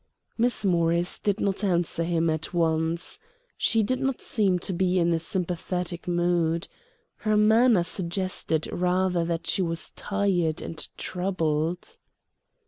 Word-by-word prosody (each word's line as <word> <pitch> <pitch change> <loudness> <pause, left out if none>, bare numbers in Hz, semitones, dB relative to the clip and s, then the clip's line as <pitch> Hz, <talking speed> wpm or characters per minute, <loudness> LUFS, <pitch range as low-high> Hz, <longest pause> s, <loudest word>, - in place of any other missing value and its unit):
Miss 240 -2 +2
Morris 170 -1 +2
did 205 0 0
not 200 0 -1
answer 175 -3 +1
him 165 -1 +1
at 160 +3 -4
once. 165 0 0 0.4
She 225 -2 +2
did 255 +5 -1
not 270 -1 -1
seem 200 -5 +1
to 185 +2 -3
be 185 +1 +1
in 170 -1 +3
a 165 - +1
sympathetic 180 0 -3
mood. 175 -1 +1 0.5
Her 215 -1 +1
manner 220 -1 +5
suggested 175 -2 -2
rather 180 0 +1
that 165 0 -2
she 165 +3 +1
was 165 -2 -1
tired 190 -6 0
and 165 - -6
troubled. 180 - -2
175 Hz, 135 wpm, -26 LUFS, 165-195 Hz, 0.5 s, manner